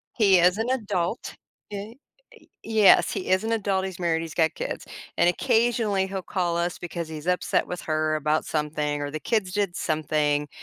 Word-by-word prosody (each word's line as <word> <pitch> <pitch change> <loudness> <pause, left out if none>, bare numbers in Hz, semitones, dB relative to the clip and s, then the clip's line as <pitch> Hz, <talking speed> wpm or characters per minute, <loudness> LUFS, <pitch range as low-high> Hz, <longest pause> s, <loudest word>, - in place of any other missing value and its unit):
He 200 -5 +5
is 180 +3 +4
an 225 +2 -1
adult, 210 -5 -2 0.4
ye 205 +4 -7 0.5
Y - - -23
yes, 220 -3 +5
he - - -4
is 185 +2 +2
an 225 - -1
adult, 195 -4 0
he's 190 -2 -6
married, 165 -2 0
he's 165 -2 -7
got 160 -2 +2
kids, - - -5 0.3
and - - +5
occasionally 225 -2 +2
he'll 190 0 -4
call 175 -2 -1
us 175 +1 -1
because 170 -1 -5
he's 155 0 -8
upset 180 0 +1
with 180 - -5
her 155 0 0
about 155 +1 0
something 150 -1 -1
or 145 - -3
the 155 +1 -5
kids 195 +2 0
did 200 -3 -1
something, 150 -2 0
180 Hz, 185 wpm, -25 LUFS, 155-205 Hz, 0.5 s, He